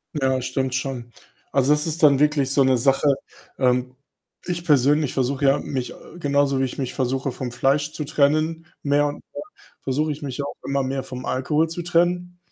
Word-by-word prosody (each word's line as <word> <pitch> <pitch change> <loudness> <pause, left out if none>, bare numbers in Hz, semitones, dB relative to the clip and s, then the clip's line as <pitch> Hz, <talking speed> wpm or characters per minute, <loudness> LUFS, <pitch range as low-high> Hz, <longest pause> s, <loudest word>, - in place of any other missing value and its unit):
Ja, 135 -3 +1
das 130 -1 -2
stimmt 130 0 -1
schon. 125 -2 -4 0.4
Also, 135 +1 +3
das 150 +2 +2
ist 160 +1 -3
dann 140 -3 +6
wirklich 150 -2 +2
so 140 0 +4
'ne 130 -1 +3
Sache. 135 +3 +3 0.4
Ähm, 125 0 +1 0.5
ich 175 -1 -3
persönlich 145 -1 +3
versuche 135 +2 0
ja, 135 +1 +4
mich, 130 -3 -4
äh - - -15 0.2
genauso 140 -3 +1
wie 135 - +2
ich 130 - -6
mich 130 -3 -3
versuche 130 +1 -1
vom 125 0 -5
Fleisch 145 +5 +1
zu 150 - -4
trennen 155 +3 +1 0.2
mehr 145 0 +3
und 145 - -3 0.2
mehr - - -6 0.4
versuche 150 +4 0
ich 150 - -6
mich 135 -3 -5
ja 140 - -1
auch - - -7
immer 140 0 0
mehr 135 0 -2
vom 125 -1 -7
Alkohol 150 +5 0
zu 165 +2 -4
trennen 175 +1 0
140 Hz, 200 wpm, -23 LUFS, 130-150 Hz, 0.5 s, dann